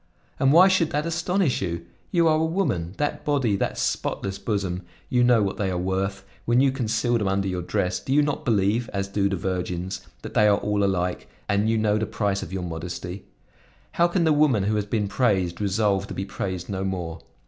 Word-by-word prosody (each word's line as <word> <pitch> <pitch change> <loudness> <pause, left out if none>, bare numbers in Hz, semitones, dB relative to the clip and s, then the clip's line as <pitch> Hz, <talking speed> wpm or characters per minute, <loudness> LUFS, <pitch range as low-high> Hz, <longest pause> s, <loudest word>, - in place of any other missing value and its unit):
And 135 - +4
why 175 +5 +8
should 185 -4 +3
that 150 +2 -1
astonish 170 -1 0
you? 85 -2 -3 0.2
You 170 -2 +3
are 155 -1 +4
a - - +1
woman; 130 - -1
that 145 0 -2
body, 135 -8 +1
that - - -2
spotless 95 0 -2
bosom, 95 -5 -2 0.3
you 125 -1 +3
know 120 -3 +5
what 95 - -2
they 100 -2 0
are 90 - -1
worth; 95 +2 -2 0.2
when 120 +1 +3
you 135 0 +4
conceal 120 -1 0
them 105 - -1
under 95 0 0
your 90 -1 -2
dress 90 +1 -1
you 145 +3 +4
do - - +1
not 145 - -2
believe, 110 +1 +1
as 100 0 -1
do 100 0 0
the 100 - -1
virgins, 90 0 -3 0.2
that - - -8
all 105 -1 +3
are - - +4
alike, 90 -2 -2 0.2
and 100 +1 +1
you 115 - +2
know 105 -1 +2
the 110 - -1
price 100 -2 -1
of 80 - -7
your 95 -1 -3
modesty. 90 +2 -6 0.7
How 170 - +3
can 175 0 +1
the 160 -2 +4
woman 145 -9 +3
who 105 +2 +1
has 105 -1 -1
been 105 -1 0
praised 95 -6 +1
resolve 100 -1 +1
to - - -7
be 95 - -3
praised 95 -2 -4
no 95 -1 -3
more? 90 -4 -3
100 Hz, 215 wpm, -24 LUFS, 95-125 Hz, 0.7 s, why